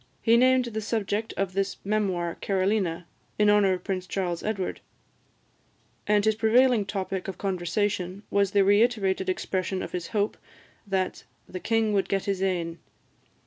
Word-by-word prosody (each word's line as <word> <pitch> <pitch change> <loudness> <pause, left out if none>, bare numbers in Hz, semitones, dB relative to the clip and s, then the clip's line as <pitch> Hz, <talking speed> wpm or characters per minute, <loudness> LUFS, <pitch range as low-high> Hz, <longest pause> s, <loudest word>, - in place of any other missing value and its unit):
He 230 0 +5
named 255 +1 +4
the 220 -2 -4
subject 215 0 -2
of 195 -2 -1
this 195 +1 -1
memoir 190 -5 0
Carolina, 190 -3 0 0.3
in 210 0 +5
honour 205 -2 +4
of 180 - -5
Prince 185 -2 -3
Charles 175 -2 -2
Edward; 200 -4 -3 1.3
and 210 0 +3
his 220 - +4
prevailing 225 0 +3
topic 190 -1 -3
of 190 - -5
conversation 190 +1 -2
was 200 -1 +3
the 200 0 +3
reiterated 200 -2 +2
expression 185 0 -2
of - - -6
his 180 -2 -4
hope 210 -1 -1 0.5
that 190 -2 -2 0.2
"the 185 - -6
king 225 +1 +1
would 195 -2 +1
get 195 -1 0
his 195 -2 -1
ain." 170 -3 -1
195 Hz, 150 wpm, -26 LUFS, 185-215 Hz, 1.3 s, He